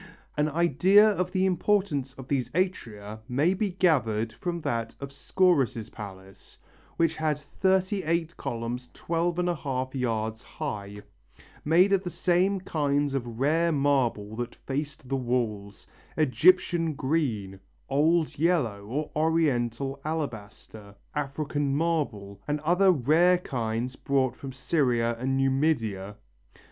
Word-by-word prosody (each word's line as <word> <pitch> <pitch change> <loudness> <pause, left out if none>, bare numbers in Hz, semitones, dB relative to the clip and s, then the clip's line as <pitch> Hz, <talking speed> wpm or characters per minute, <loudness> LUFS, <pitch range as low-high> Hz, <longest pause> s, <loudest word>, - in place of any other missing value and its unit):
An 150 +1 +1
idea 175 +6 +5
of 185 -4 0
the 185 0 +1
importance 180 -8 +1
of 130 -1 -11
these 135 -3 -1
atria 110 - -2
may 145 +9 +2
be 205 +1 -1
gathered 115 - +1
from 170 +6 -4
that 115 -5 -2
of 140 0 -7
Scaurus' 140 - +1
palace, 95 -2 -11 0.4
which 165 -1 +1
had 155 -2 0
thirty 190 +6 0
eight 165 0 -1
columns 120 +1 -4
12½ 165 -6 -1
yards 110 -4 -2
high, 105 -11 -6 0.6
made 180 +6 +4
of 195 - +3
the 180 - -3
same 185 +3 +1
kinds 145 -4 0
of 120 -4 -4
rare 165 +5 +2
marble 130 -8 +1
that 120 0 -4
faced 140 -1 -5
the 135 - -1
walls 115 -6 -2 0.3
Egyptian 165 +2 +3
green, 120 -11 -1 0.3
old 155 +3 +2
yellow 145 - +1
or 145 +6 -3
Oriental 140 -4 0
alabaster, 110 -8 -6 0.2
African 145 -1 -2
marble 135 -12 -2
and 150 0 0
other 180 +5 +4
rare 165 +5 +4
kinds 120 -5 -3
brought 130 -2 0
from 135 0 -8
Syria 125 -4 +1
and 135 +2 0
Numidia. 130 -8 0
140 Hz, 120 wpm, -27 LUFS, 120-165 Hz, 0.6 s, idea